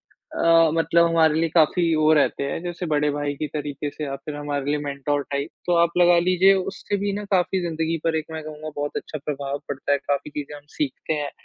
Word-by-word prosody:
अ, 165 -1 +3
मतलब 170 +1 +3
हमारे 160 -2 +3
लिए 165 - +1
काफ़ी 165 +1 +3
वो 155 0 +4
रहते 140 -1 +2
हैं, 150 +4 -3
जैसे 175 0 -4
बड़े 150 -1 +1
भाई 145 0 -2
की 150 - -3
तरीके 145 -1 -4
से 150 +1 -6
आप 135 0 -5
फिर 150 - -4
हमारे 145 -1 -3
लिए 150 - +1
मेन्टर 145 +1 -1
टाइप। 140 +3 -2 0.2
तो 175 - +1
आप 170 - +3
लगा 175 0 +6
लीजिए 185 +2 +4
उससे 195 +2 -2
भी 200 0 -1
ना 205 +1 -4
काफ़ी 185 0 +2
ज़िंदगी 165 -1 -1
पर 165 -1 +1
एक 155 - -1
मैं 160 - -5
कहूँगा 155 0 -7
बहुत 145 0 -3
अच्छा 155 - -5
प्रभाव 140 -1 -3
पड़ता 140 +1 -2
है, 140 - +3
काफ़ी 140 +1 -2
चीज़ें 145 0 -6
हम 145 - -15
सीखते 150 +2 -2
हैं, 145 -2 -3
155 Hz, 225 wpm, -23 LUFS, 145-170 Hz, 0.2 s, लगा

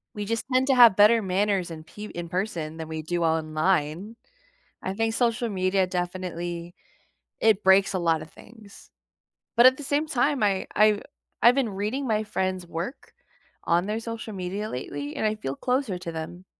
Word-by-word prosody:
We 210 -1 -4
just 230 +2 -2
tend 255 +1 +3
to 270 - +4
have 235 -5 +8
better 215 +3 +6
manners 195 -1 0
and 155 -1 -9
pe 210 +5 -9
in 175 -4 -7
person 170 -4 -3
than 160 -1 -6
we 160 0 -5
do 170 +2 -2
online. 160 +4 0 0.7
I 190 - -3
think 225 +2 -1
social 235 0 0
media 185 -1 +1
definitely 175 -1 -4 0.7
it 215 -2 +3
breaks 190 +1 +5
a 190 - -1
lot 165 -3 +1
of 155 - -12
things, 215 -3 -16 0.7
but 235 - +7
at 260 0 +7
the 290 - -8
same 290 +3 0
time, 285 -1 +1
I 195 -2 +1
I 210 -1 +4 0.4
I've 240 +2 +6
been 265 -5 +1
reading 210 +8 -3
my 215 -2 +1
friends' 185 -3 -2
work 170 - -6 0.5
on 175 +2 +2
their 210 +2 -2
social 230 -1 -6
media 195 +3 -4
lately, 145 +3 -5
and - - -1
I 215 0 +1
feel 135 -10 -5
closer 250 - -1
to 170 -2 -6
them. 165 +3 -7
195 Hz, 180 wpm, -26 LUFS, 175-225 Hz, 0.7 s, have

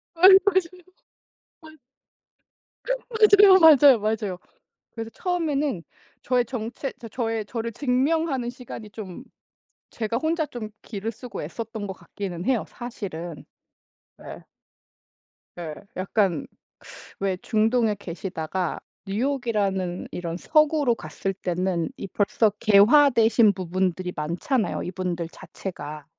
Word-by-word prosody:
아이 365 +3 +8 0.2
맞아요. 375 -4 +2 0.9
맞 315 -1 -14 1.4
맞아요, 410 -3 +7
맞아요, 290 -6 +8
맞아요. 210 -3 -2 0.5
그래서 225 -1 -6
처음에는 300 - -1 0.4
저의 250 -1 +1
정체, 240 +3 -5
저 230 - -8
저의 225 -2 -2
저를 230 0 -4
증명하는 270 +1 0
시간이 245 -3 -9
좀 205 +1 -8 0.7
제가 230 +1 -2
혼자 315 +1 0
좀 230 -6 -7
기를 215 0 -5
쓰고 235 -2 -8
애썼던 220 +5 -6
것 - - -3
같기는 180 0 -7
해요 250 -3 +1
사실은. 180 -9 -7 0.8
예. - - -10 1.1
예. 160 -3 -5 0.2
약간 185 -3 0 0.7
왜 195 -1 -1
중동에 220 -1 +2
계시다가 180 -2 -4 0.3
뉴욕이라는 205 -6 -1
이런 170 -1 -4
서구로 305 - +3
갔을 195 +3 -4
때는 180 -2 -2
이 - - -6
벌써 205 +3 +1
개화되신 225 0 +5
부분들이 185 0 -2
많잖아요 175 - -1
이분들 180 -2 -3
자체가. 155 -6 -8
220 Hz, 245 characters per minute, -24 LUFS, 185-260 Hz, 1.4 s, 아이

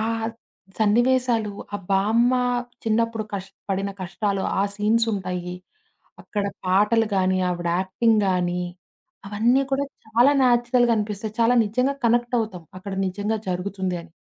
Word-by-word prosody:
ఆ! - - 0 0.8
సన్నివేసాలు, 235 0 +2 0.2
ఆ - - +1
బామ్మ 220 +6 +3 0.5
చిన్నప్పుడు 225 0 0
కష్ 195 0 -5 0.2
పడిన 195 +1 -1
కష్టాలు, 190 +2 -2 0.2
ఆ - - +4
సీన్సుంటాయి. 205 -5 0 0.7
అక్కడ 205 -1 -3 0.2
పాటలు 210 +4 +3
గానీ, 185 0 +2
ఆవిడ 175 -1 -2
యాక్టింగ్ 215 +4 +2
గాని, 180 -1 0 0.6
అవన్నీ 230 +6 +2
కూడా 275 +1 +1 0.2
చాలా 240 +5 +4
నేచురల్‌గా 240 -1 +3
అనిపిస్తాయి. 210 0 -3
చాలా 240 +2 +4
నిజంగా 250 +6 0
కనెక్టవుతాం. 230 -6 0
అక్కడ 195 +1 -7 0.2
నిజంగా 205 +4 -2
జరుగుతుంది 185 0 -2
అని. 165 - -17
210 Hz, 120 wpm, -23 LUFS, 190-230 Hz, 0.8 s, ఆ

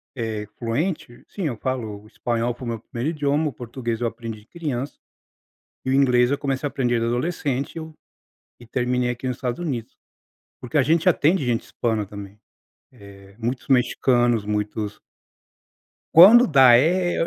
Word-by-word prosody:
é 110 -4 -3
fluente? 125 +2 -3
Sim, 200 - -6
eu 120 - -3
falo 110 -6 -4
o - - -17
espanhol 120 +1 -2
foi 125 - -10
o 120 - -4
meu 115 - -4
1º 120 +6 -4
idioma, 150 +1 0
o 140 - -11
português 120 -1 -5
eu 120 - +1
aprendi 115 -2 -7
criança, 140 -2 -5 0.9
e 130 - -1
o - - +1
inglês 125 -2 +4
eu 140 - 0
comecei 135 0 -2
a - - -2
aprender 120 -3 0
de 115 - 0
adolescente 135 +2 -2
eu, 160 -1 -7 0.7
e 120 - -14
terminei 125 +1 -1
aqui 125 +2 -5
nos 125 -1 -3
Estados 125 -2 -3
Unidos. 130 -10 -4 0.7
Porque 125 +5 -2
a - - +5
gente 165 +6 +2
atende 165 -1 +2
gente 120 -2 0
hispana 110 -3 -2
também. 100 +1 -10 0.8
Eh, 100 0 -17
muitos 120 +2 -4
mexicanos, 120 -3 +2
muitos 105 0 -3 1.1
Quando 215 +9 +9
dá, 130 -6 +7
eu 175 +5 +1
125 Hz, 165 wpm, -23 LUFS, 115-145 Hz, 1.1 s, Quando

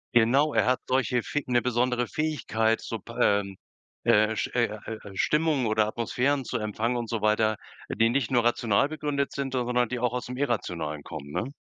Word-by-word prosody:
Genau, 135 +6 +4
er - - +2
hat 130 0 +3
solche 125 -2 +1
Fäg 145 -2 -3
'ne 120 -1 +3
besondere 125 0 +1
Fähigkeit, 115 -7 0
so 115 - -5
p 115 - -12
ähm, 100 -4 +2 0.5
äh, 110 +1 +4
Sch - - 0
äh, 120 -1 +3 0.2
äh, 110 -1 -5 0.2
Stimmungen 150 +3 +1
oder 110 -1 +2
Atmosphären 125 +5 0
zu - - -2
empfangen 110 +3 -1
und 120 -2 -4
so 115 -3 -2
weiter, 110 0 +3 0.3
die 115 +1 +2
nicht 125 -1 0
nur 120 -3 +2
rational 120 +1 +2
begründet 145 -2 -2
sind, 135 -1 -4
sondern 125 -1 +1
die 125 - -2
auch 125 -1 0
aus 125 - -3
dem 125 +1 -6
Irrationalen 85 - -2
kommen, 70 -1 -8
ne? 130 - -3
120 Hz, 190 wpm, -27 LUFS, 110-130 Hz, 0.5 s, Genau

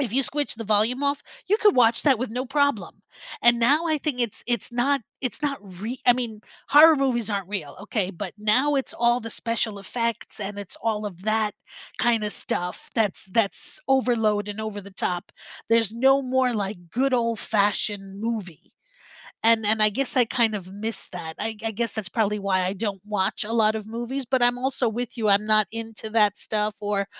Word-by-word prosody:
if 245 -7 -2
you 270 +3 +6
switch 290 +2 0
the 225 0 -6
volume 220 +6 +3
off, 285 0 0 0.2
you 415 +3 +3
could 420 -3 +4
watch 235 -2 +4
that 270 -6 +4
with 255 -1 -3
no 250 +3 -3
problem, 275 - 0 0.4
and 240 0 +5
now 285 +8 +3
I 310 -2 +1
think 280 -4 -2
it's 235 -4 -2
it's 240 -1 -2
not 270 +4 +1 0.2
it's 255 +3 -4
not 280 -2 -1
re 205 +6 -7
I 245 - +8
mean, 235 -4 -4 0.3
horror 310 +2 +8
movies 245 -5 0
aren't 200 -3 -2
real, 180 -9 -5
okay, 205 -2 -2
but 185 0 -7
now 255 +8 +2
it's 270 - -1
all 240 +1 +3
the 230 -1 -6
special 225 -2 -2
effects, 230 +2 -4
and 205 0 -5
it's 200 -2 -8
all 215 -2 -1
of 180 -2 -9
that 215 0 +1 0.5
kinda 225 -3 +1
stuff 180 -2 -4
that's 215 -5 0
that's 225 +10 -1
overload 225 -6 +2
and 205 +1 -5
over 215 -2 -5
the 200 0 -12
top. 180 -2 -3 0.4
There's 225 -2 +3
no 270 +4 +4
more, 255 -1 +1
like, 195 -5 -4
good 265 +5 +1
old-fashioned 205 -4 0
movie, 215 -8 -5 0.7
and 225 -1 +4
and 215 +1 +3
I 215 - +6
guess 270 +6 -2
I 250 - +6
kind 230 -2 +1
of 190 -2 -6
missed 220 +2 -5
that. 160 -3 -6
I 220 0 -3
I 225 - 0
guess 230 +1 -2
that's 215 -5 -3
probably 210 +1 0
why 190 -2 +1
I 185 - -1
don't 200 -1 -4
watch 210 -1 -1
a 220 - -4
lot 220 -2 +3
of 215 -1 -5
movies, 240 +4 -4
but 260 -1 +2
I'm 245 0 +4
also 260 -1 0
with 240 +2 -4
you, 220 -3 0
I'm 200 +1 +4
not 215 -1 +4
into 225 -1 -4
that 210 -2 +3
stuff 210 -1 0
or 205 -1 -1
225 Hz, 200 wpm, -24 LUFS, 205-245 Hz, 0.7 s, I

